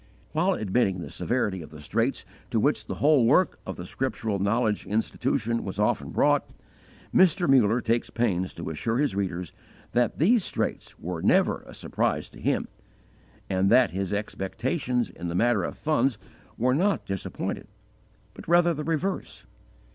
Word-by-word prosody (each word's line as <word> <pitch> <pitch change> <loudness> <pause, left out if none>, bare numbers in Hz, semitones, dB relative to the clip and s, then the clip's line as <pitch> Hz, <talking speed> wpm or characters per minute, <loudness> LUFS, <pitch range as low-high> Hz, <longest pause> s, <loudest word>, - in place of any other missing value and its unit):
While 180 +5 +2
admitting 100 - +1
the - - -7
severity 105 -7 -1
of 75 - -10
the 75 0 -12
straits 115 - -1 0.2
to - - +1
which - - +1
the - - -3
whole 145 -3 +4
work 145 +10 +3
of 95 - -4
the 90 - -7
Scriptural 110 -2 -2
Knowledge 105 +1 0
Institution 115 +2 -1
was 95 -1 -5
often 105 0 +1
brought, - - +2 0.6
Mr. 185 -1 +4
Muller 120 -3 +4
takes 115 +1 0
pains 95 -6 -1
to 85 - -5
assure 115 +9 -1
his 145 -8 +1
readers 90 -3 -3 0.4
that 120 0 +1
these 210 - +4
straits - - -3
were 85 -1 -5
never - - +3
a - - -11
surprise - - -1
to - - -14
him, - - 0 0.8
and 95 0 +1
that 125 -6 +5
his 95 +1 -3
expectations 120 - -2
in 85 - -7
the 85 - -3
matter 120 +5 +2
of - - -4
funds 135 -6 +1 0.4
were 125 +2 +2
not 195 +8 +1
disappointed, 95 +1 -4 0.7
but - - -12
rather 175 0 +4
the 150 -1 -4
reverse. 165 +5 -3
115 Hz, 160 wpm, -26 LUFS, 95-140 Hz, 0.8 s, that